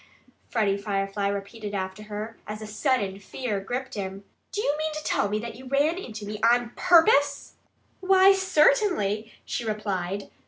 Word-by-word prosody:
Freddie 200 Hz, -3 st, +1 dB
Firefly 200 Hz, 0 st, -1 dB
repeated 200 Hz, +1 st, -4 dB
after 190 Hz, +1 st, -4 dB
her, 215 Hz, +2 st, -6 dB
as 210 Hz, 0 st, -5 dB
a 215 Hz, -, -7 dB
sudden 215 Hz, -3 st, 0 dB
fear 210 Hz, +1 st, -3 dB
gripped 250 Hz, +7 st, -4 dB
him. 195 Hz, -1 st, -5 dB, 0.3 s
"Do -, -, -3 dB
you 290 Hz, -9 st, +1 dB
mean 310 Hz, +1 st, -2 dB
to 305 Hz, 0 st, -5 dB
tell 200 Hz, -, +1 dB
me 210 Hz, -, 0 dB
that 230 Hz, +1 st, -5 dB
you 255 Hz, +3 st, -12 dB
ran 290 Hz, +6 st, +2 dB
into 220 Hz, -, -7 dB
me 210 Hz, +1 st, -5 dB
ON 240 Hz, +1 st, +3 dB
PURPOSE?" 290 Hz, -5 st, +4 dB, 0.5 s
"Why, 380 Hz, +1 st, +6 dB
certainly!" 355 Hz, -, +2 dB
she 240 Hz, -, -3 dB
replied. 200 Hz, -3 st, -3 dB
220 Hz, 160 wpm, -26 LUFS, 200-285 Hz, 0.5 s, Why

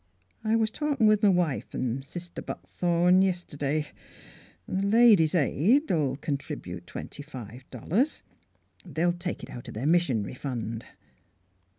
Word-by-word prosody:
I 220 Hz, +1 st, +2 dB
was 220 Hz, -1 st, +2 dB
talkin' 285 Hz, -3 st, 0 dB
with 215 Hz, 0 st, +4 dB
m' 200 Hz, -3 st, +6 dB
wife 170 Hz, -6 st, -1 dB
an' 130 Hz, +1 st, -1 dB
Sister 175 Hz, +5 st, -8 dB
Buckthorn 175 Hz, +1 st, +2 dB
yist'day, 155 Hz, -6 st, -1 dB, 0.8 s
an' -, -, -2 dB
the 200 Hz, -, 0 dB
Ladies' 210 Hz, -7 st, +6 dB
Aid 195 Hz, -, +3 dB
'11 145 Hz, -6 st, +1 dB
contribute 95 Hz, -, -5 dB
twenty -, -, -7 dB
five 130 Hz, -3 st, -10 dB
dollars. 195 Hz, -, -1 dB, 0.6 s
They'll 175 Hz, 0 st, 0 dB
take 175 Hz, +1 st, -5 dB
it -, -, -8 dB
out 120 Hz, -, -8 dB
their 110 Hz, +5 st, -4 dB
missionary 145 Hz, -, +2 dB
fund." 115 Hz, -4 st, -4 dB
170 Hz, 130 wpm, -28 LUFS, 135-195 Hz, 0.8 s, m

